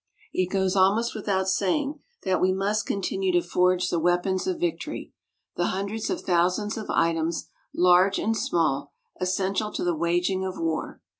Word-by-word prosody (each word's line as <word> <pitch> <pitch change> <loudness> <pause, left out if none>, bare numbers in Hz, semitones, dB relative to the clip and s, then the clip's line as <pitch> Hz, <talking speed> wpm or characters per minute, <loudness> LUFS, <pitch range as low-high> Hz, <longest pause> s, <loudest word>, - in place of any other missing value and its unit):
It 185 -1 0
goes 190 0 0
almost 200 +5 +3
without 195 -3 -1
saying 275 +11 0 0.2
that 190 -2 +1
we 185 - +4
must 200 +3 0
continue 190 -1 -1
to 175 0 +2
forge 180 +1 +2
the 170 - +1
weapons 175 - +1
of 365 -3 -1
victory 345 -1 -3 0.4
the 175 - +1
hundreds 200 +4 -3
of - - -2
thousands 185 +4 +1
of 220 - -6
items, 165 0 0 0.2
large 180 +2 +4
and 225 +1 0
small, 145 -8 0 0.3
essential 190 +3 0
to - - -2
the 175 -1 +1
waging 175 +3 0
of 185 -1 -4
war. 165 -1 -3
185 Hz, 160 wpm, -26 LUFS, 175-200 Hz, 0.4 s, we